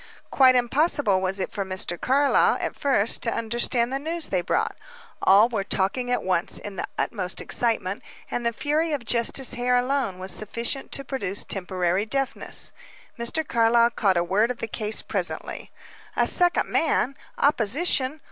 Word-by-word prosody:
Quite 260 -2 +5
impossible 250 - +3
was 190 +1 -1
it 185 - -3
for 200 - -3
Mr. 185 -2 -2
Carlyle, 280 +2 +3
at - - -3
first, 245 -6 +1
to 230 - -1
understand 235 +2 0
the 270 - -1
news 325 +2 -3
they 185 -2 0
brought. - - -1 0.5
All 200 +4 +6
were 220 -5 -2
talking 205 +6 -1
at 245 - 0
once, 185 -2 0
in 205 -1 -7
the - - -3
utmost 185 -5 -2
excitement; 215 -5 -1 0.3
and 245 - -2
the 235 - +1
fury 305 +6 -1
of 270 -5 -3
Justice 240 +3 +2
Hare 245 +1 +1
alone 250 -6 -1
was 185 +1 -6
sufficient 235 +5 -2
to 275 - -1
produce 230 -8 -2
temporary 185 +1 -1
deafness. 270 +3 -1 0.5
Mr. 290 +7 0
Carlyle 235 0 +3
caught 195 -5 +1
a 170 - +2
word 205 +6 +1
of 250 - -3
the - - -4
case 215 0 -1
presently. - - -3 0.5
"A - - +2
second 355 -1 +2
man? 275 -4 0 0.2
Opposition? 280 - +2
235 Hz, 165 wpm, -24 LUFS, 195-270 Hz, 0.5 s, All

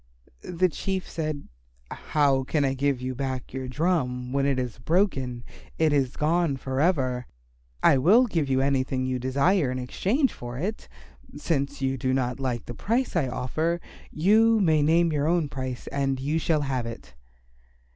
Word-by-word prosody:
The 180 +1 +1
Chief 190 +2 -3
said, 155 -3 -4 0.4
"How 140 -3 +1
can 145 +2 0
I 135 - +1
give 135 -1 0
you 130 0 -3
back 130 -1 -4
your 130 -1 -4
drum 130 -4 -1
when 140 0 +2
it 140 -2 +1
is 125 -2 -3
broken? 135 - 0 0.3
It 160 -2 +3
is 135 -3 +1
gone 160 -2 +1
for 130 0 -3
ever. 130 -8 +1 0.6
I 135 - +5
will 215 - +5
give 165 - -1
you 130 0 +2
anything 135 -1 0
you 130 -1 -1
desire 140 +5 +2
in 130 - -3
exchange 205 - 0
for 120 0 -7
it. 200 +9 -4 0.5
Since 140 -3 -2
you 135 0 0
do 130 +1 0
not 125 0 -1
like 125 -3 -2
the 120 - -7
price 230 - -1
I 155 -6 +2
offer, 155 +7 -1 0.3
you 220 +7 +4
may 160 -6 +3
name 165 +2 +3
your 145 0 0
own 165 -3 +1
price 130 -3 -5
and 135 -1 -1
you 150 +4 0
shall 160 -1 +1
have 130 -4 -2
it." 115 - -9
140 Hz, 170 wpm, -26 LUFS, 130-165 Hz, 0.6 s, I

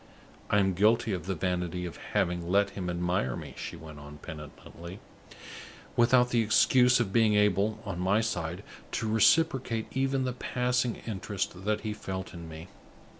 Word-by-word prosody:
"I 105 - +3
am 95 -2 +3
guilty 110 +4 +3
of 90 -2 -4
the 95 - -1
vanity 90 0 -2
of 85 -4 -7 0.2
having 85 -1 0
let 100 +1 +3
him 90 -2 -4
admire 90 -7 -1
me," - - -8
she - - -6
went 75 -2 -11
on, 75 0 -11
penitently, 80 +4 -10 1.0
"without 125 +1 +4
the 120 - +3
excuse 125 +3 +4
of 100 -5 -1
being 110 -2 +4
able, 105 +1 +2
on 100 -4 -4
my 95 +4 +2
side, 90 -4 -3 0.3
to 110 - -1
reciprocate 115 +1 +3
even 135 0 0
the 130 -1 -1
passing 125 -1 0
interest 95 -3 -4
that 105 0 0
he 110 -1 -3
felt 95 -2 -6
in 85 -2 -9
me. 80 +2 -9
100 Hz, 165 wpm, -29 LUFS, 90-115 Hz, 1.0 s, without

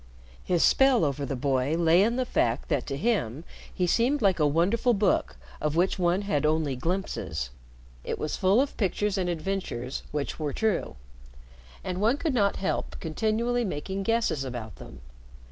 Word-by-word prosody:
His 175 -2 +1
spell 265 -8 +5
over 140 -1 -2
the 135 - -2
boy 135 +2 0
lay 170 +1 +4
in 230 +4 +2
the 255 0 0
fact 120 - 0
that 145 -6 0
to 135 - -3
him 160 - -1 0.3
he 180 - -1
seemed 240 +10 +2
like 195 -6 +2
a 150 - +4
wonderful 200 - +2
book 200 - +1 0.3
of 150 0 -1
which 180 +3 +1
one 180 +3 +2
had 155 -8 0
only 155 -3 +1
glimpses. 125 - -3 0.5
It - - -3
was 155 - -3
full 195 +4 +3
of 275 +1 0
pictures 205 0 0
and 185 -3 -1
adventures 170 -8 -3
which 145 +1 -3
were 150 -3 -2
true, 215 - -1 0.9
and 185 +1 -3
one 230 +6 +3
could 310 -1 -1
not 200 -5 +2
help 190 - -3
continually 220 +8 0
making 190 0 -3
guesses 225 -9 0
about 120 -5 -6
them. 65 - -12
180 Hz, 170 wpm, -27 LUFS, 145-215 Hz, 0.9 s, spell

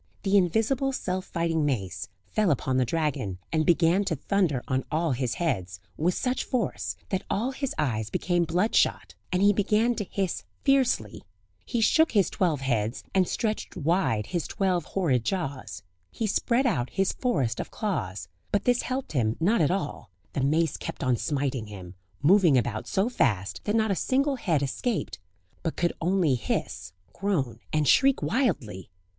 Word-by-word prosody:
The 195 +1 +2
invisible, 225 +9 +2
self 185 -6 -2
fighting 165 -2 0
mace 100 - -2 0.2
fell 215 -3 +2
upon 130 -2 +1
the 130 - +3
dragon 130 - -1 0.2
and 155 -1 +1
began 175 +3 +4
to 165 - 0
thunder 155 -4 0
on 130 0 0
all 160 0 +1
his 125 -1 -1
heads 95 - -2 0.2
with 175 +4 +1
such 250 0 -1
force, 105 - -2
that 190 - 0
all 235 +6 0
his 270 0 -3
eyes 110 -8 -1
became 175 +5 +1
bloodshot, 180 +7 +1 0.2
and 185 +1 +2
he 205 0 +6
began 210 +4 +2
to 225 - -3
hiss 190 -1 -2 0.2
fiercely; 260 - +2 0.4
he 235 - -1
shook 320 +8 +4
his 200 -6 +3
twelve 165 -7 0
heads, 115 -3 -1
and 185 -2 +3
stretched 215 -4 -2
wide 160 - +1
his 175 - -3
twelve 185 -5 0
horrid 145 -11 0
jaws; 130 - -3 0.3
he 225 - -3
spread 235 +5 +1
out 140 - +1
his 195 -1 +1
forest 135 - 0
of - - -4
claws; 95 - -3 0.2
but 205 - +1
this 245 -1 +3
helped 260 +1 -3
him 115 -6 0
not 190 +5 +3
at 150 - +3
all, 175 - -3 0.2
the 140 - -1
mace 155 +3 +1
kept - - -6
on 130 -2 +2
smiting 135 -3 -2
him, 95 -4 -9 0.3
moving 170 -3 +6
about 115 -3 -1
so 195 +3 +1
fast, 100 - 0
that 210 - 0
not 220 -2 +2
a - - +2
single 275 +6 +1
head 160 - 0
escaped, 205 - -2 0.4
but 160 - -2
could 175 -1 +1
only 175 -4 +2
hiss, 115 -6 -3 0.2
groan, 145 - -1
and 155 -2 +1
shriek 270 - +4
wildly! 140 - -1
170 Hz, 170 wpm, -27 LUFS, 130-205 Hz, 0.4 s, he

